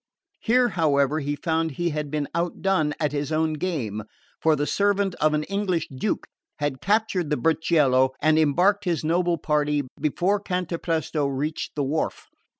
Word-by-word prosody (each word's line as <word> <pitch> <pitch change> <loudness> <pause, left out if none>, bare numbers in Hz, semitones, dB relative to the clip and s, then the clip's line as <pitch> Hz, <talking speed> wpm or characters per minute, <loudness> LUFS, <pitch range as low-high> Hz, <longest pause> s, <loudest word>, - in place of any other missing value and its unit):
Here, 245 +1 +3
however, 150 -4 +2
he 145 0 -2
found 160 0 -1
he 170 +4 -1
had 150 -1 -3
been 150 -1 -2
outdone 170 -2 0
at 150 -3 0
his 145 0 -3
own 155 0 +1
game; 145 - -3 0.4
for 160 -1 +4
the 145 0 -1
servant 200 +1 +1
of 155 0 +3
an 150 - 0
English 190 -3 -1
Duke 190 +11 -2 0.3
had 145 -3 -2
captured 205 -5 +1
the 150 - +1
burchiello 145 -3 +3
and 155 +1 +3
embarked 180 +7 +3
his 170 -5 0
noble 170 +2 +1
party 150 -1 0 0.2
before 175 +7 +1
Cantapresto 165 -5 -2
reached 140 +3 -3
the 145 - 0
wharf. 145 +4 -2
155 Hz, 155 wpm, -24 LUFS, 145-180 Hz, 0.4 s, for